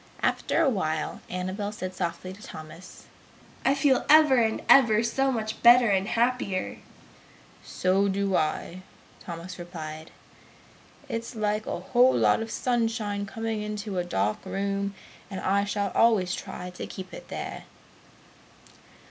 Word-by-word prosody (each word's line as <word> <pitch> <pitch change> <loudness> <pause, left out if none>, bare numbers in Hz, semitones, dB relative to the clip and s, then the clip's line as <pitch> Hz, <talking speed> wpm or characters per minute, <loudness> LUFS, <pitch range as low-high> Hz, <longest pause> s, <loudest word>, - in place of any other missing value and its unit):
After - - +1
a - - +3
while 155 - -1
Annabel 185 +3 -3
said 185 -3 -6
softly 180 0 -4
to 200 - -15
Thomas, 165 +1 -11 0.6
"I 270 - +3
feel 275 -2 +3
ever 305 -3 +7
and 225 -2 +1
ever 230 -5 +6
so 270 +3 +1
much 220 -3 -3
better 240 -1 +7
and 195 0 +1
happier!" 235 -5 -1 0.8
"So 190 +2 +1
do 195 -1 0
I!" 170 +3 -1 0.4
Thomas 175 +2 -8
replied. 160 -2 -7 1.0
"It's 230 +1 -5
like 215 0 -1
a - - -3
whole 245 +8 +4
lot - - +3
of 225 - -4
sunshine 225 -5 -1
coming 225 +1 -3
into 210 -2 -4
a - - 0
dark 105 - -1
room, 200 0 -2 0.3
and 190 -2 -5
I 200 +1 +1
shall 205 -1 -1
always 205 -6 +3
try 180 -2 -6
to 180 - -7
keep 185 -1 -9
it - - -10
there!" - - -6
200 Hz, 140 wpm, -27 LUFS, 185-230 Hz, 1.0 s, ever